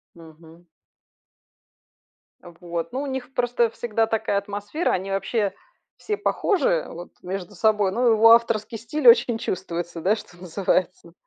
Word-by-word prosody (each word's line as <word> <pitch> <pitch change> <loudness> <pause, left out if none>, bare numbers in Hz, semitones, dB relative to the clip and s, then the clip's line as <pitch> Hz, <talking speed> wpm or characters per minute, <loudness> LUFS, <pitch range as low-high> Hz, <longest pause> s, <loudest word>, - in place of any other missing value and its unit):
Мгм. 165 +1 -16 1.8
А 175 - -13
вот. 170 -1 -4
Ну 265 - -2
у 290 - -4
них 265 -1 -5
просто 240 -1 +1
всегда 225 -1 -1
такая 220 -2 -1
атмосфера, 205 - -2
они 190 +1 -2
вообще 195 +1 -1 0.4
все 420 - -3
похожи, - - +1
вот, 175 +1 -10
между 190 +2 -6
собой, 210 -1 +2
но 245 +5 +1
его 225 0 +6
авторский 230 -1 +3
стиль 255 +5 -2
очень 235 -1 +6
чувствуется, 175 -2 -4
да, 200 +6 +2
что 180 -5 -12
называется. 180 -1 -2
210 Hz, 140 wpm, -23 LUFS, 180-235 Hz, 1.8 s, его